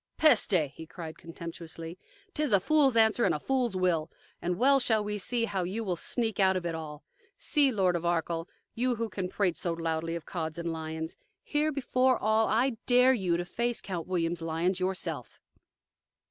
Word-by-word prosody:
"Peste!" 185 - +4
he 160 - -10
cried 160 -2 -8
contemptuously. 165 0 -8 0.4
"'T 305 - -1
is 295 -8 +1
a 200 - +7
fool's 275 +2 +4
answer 220 +1 +4
and - - +3
a - - -3
fool's 255 -6 0
will. 175 -4 +1 0.3
And 175 0 -1
well 275 +3 +5
shall 220 -4 +2
we 210 0 -3
see 235 +4 0
now 230 - -1
how 190 -2 0
you 200 +6 -3
will 185 -4 -1
sneak 225 +5 -2
out 190 -1 +4
of 180 - -5
it 170 - -1
all. 155 -2 -7 0.3
See, 285 -3 +3
Lord 190 -5 +2
of 170 - -2
Arkell, 170 0 -1 0.2
you 245 +1 0
who 230 0 -3
can 190 -2 -4
prate 185 -3 0
so 170 - -1
loudly 165 0 -2
of 170 - -6
Cods 160 -3 -4
and 170 -1 -3
lions: 160 0 -5 0.3
here 300 +1 0
before 260 -2 +2
all, 220 +1 +2
I 235 +2 +1
dare 250 +1 +6
you 185 -8 0
to 175 - -3
face 235 +6 -1
Count 175 -4 -5
William's 170 -2 -1
lions 165 +3 0
yourself!" 180 -7 -3
185 Hz, 195 wpm, -29 LUFS, 165-230 Hz, 0.4 s, a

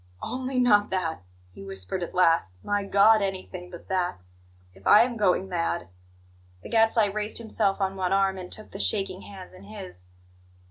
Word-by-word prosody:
"Only 260 +1 -3
not 210 -5 +4
that!" 170 - -2 0.3
he 100 - -11
whispered 95 - -5
at 175 - -5
last. 165 - +3
"My 205 0 0
God, 205 +2 +5
anything 185 -2 -4
but 175 -1 -11
that! 180 - -1 0.5
If 95 +1 -10
I 210 +2 +8
am 240 0 -3
going 190 -3 +2
mad 170 - -2 0.4
" 90 0 -30
The - - -9
Gadfly 225 -1 +4
raised 210 0 -2
himself 215 -3 0
on 195 -1 -1
one 185 -1 -1
arm, 195 -1 +2
and 180 -1 -9
took 215 - -12
the 195 - -8
shaking 195 -3 -1
hands 190 -3 -11
in 185 - -14
his. 190 - -9
190 Hz, 180 wpm, -26 LUFS, 175-210 Hz, 0.5 s, I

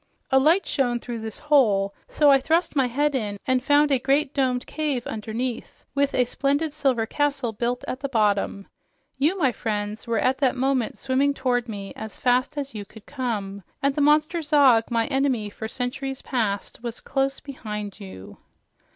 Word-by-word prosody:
"A 265 - +6
light 320 +8 +4
shone 245 -4 0
through 235 -1 -6
this 220 -1 -6
hole, 215 -10 +3
so 295 -2 +4
I 275 - +6
thrust 325 +4 +1
my 265 -3 +3
head 290 +4 +1
in 210 -6 -2
and 255 -1 +1
found 290 +1 +4
a 270 - +3
great 275 +2 +1
domed 255 -3 0
cave 290 -6 -2
underneath 225 +3 -5
with 280 0 +1
a 250 - +3
splendid 285 +5 0
silver 270 -7 +1
castle 280 -2 -1
built 240 +3 -2
at 255 - -4
the 275 0 -4
bottom. 205 -4 +1 0.5
You, 315 +8 +2
my 275 -8 +3
friends, 210 -1 -4
were 230 -1 0
at 260 +3 +1
that 270 -3 +2
moment 260 -2 0
swimming 270 +2 +1
toward 245 -3 0
me 200 -2 -6
as 220 -1 -8
fast 255 +4 +1
as 280 -1 -4
you 210 -2 -5
could 210 +2 -15
come, 215 -8 -4 0.2
and 280 0 +3
the 295 - -1
monster 305 +3 +3
Zog, 280 -7 +4
my 230 -1 +1
enemy 265 -6 0
for 220 - -6
centuries 260 +3 -4
past, 220 -5 -2
was 235 -1 -5
close 270 0 -1
behind 210 -7 -6
you. 95 0 -11
255 Hz, 180 wpm, -24 LUFS, 225-280 Hz, 0.5 s, A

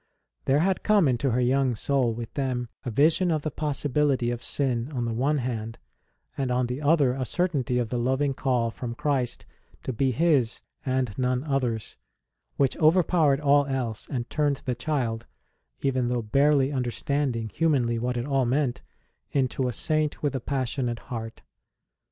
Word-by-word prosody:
There 140 +3 +3
had 190 +2 +1
come 205 -7 +4
into 130 +1 +1
her 125 +1 +1
young 130 0 +2
soul, 130 +1 +1
with 115 0 -6
them, 125 -4 -2
a - - -3
vision 155 - +3
of 155 -3 0
the 155 - -2
possibility 145 -3 0
of 120 0 -4
sin 125 0 -1
on 125 -4 -2
the 115 - -2
one 140 +6 +1
hand, 115 -3 -3 0.6
and 135 -2 -1
on 125 0 +1
the 125 +4 -4
other 145 -4 +3
a 130 0 -2
certainty 140 -4 0
of 120 -3 -1
the 125 - -1
loving 130 +3 +1
call 125 -4 0
from 115 +3 -6
Christ 140 -4 -1 0.4
to 130 - -3
be 130 +4 +1
His 130 -3 +2 0.2
and 130 -5 -1
none 125 0 +1
other 135 -6 0
s, 110 - -10 0.6
which 135 -2 +2
overpowered 155 -3 +3
all 145 -1 +4
else 125 -5 -3
and 120 -3 -3
turned 145 -1 0
the 125 - 0
child 120 -4 -2 0.5
even 130 -3 +1
though 120 -1 -1
barely 140 +4 +3
understand 135 +1 -1
ing, 115 -1 -3
humanly, 130 -8 +1
what 125 +1 -1
it 120 - -2
all 135 -3 +1
meant 130 0 0 0.5
into 130 -2 +1
a - - -1
Saint 155 +6 0
with 145 -2 0
a 130 - -2
passionate 130 -2 -2 0.2
heart. 115 -1 -6
130 Hz, 175 wpm, -26 LUFS, 120-145 Hz, 0.6 s, come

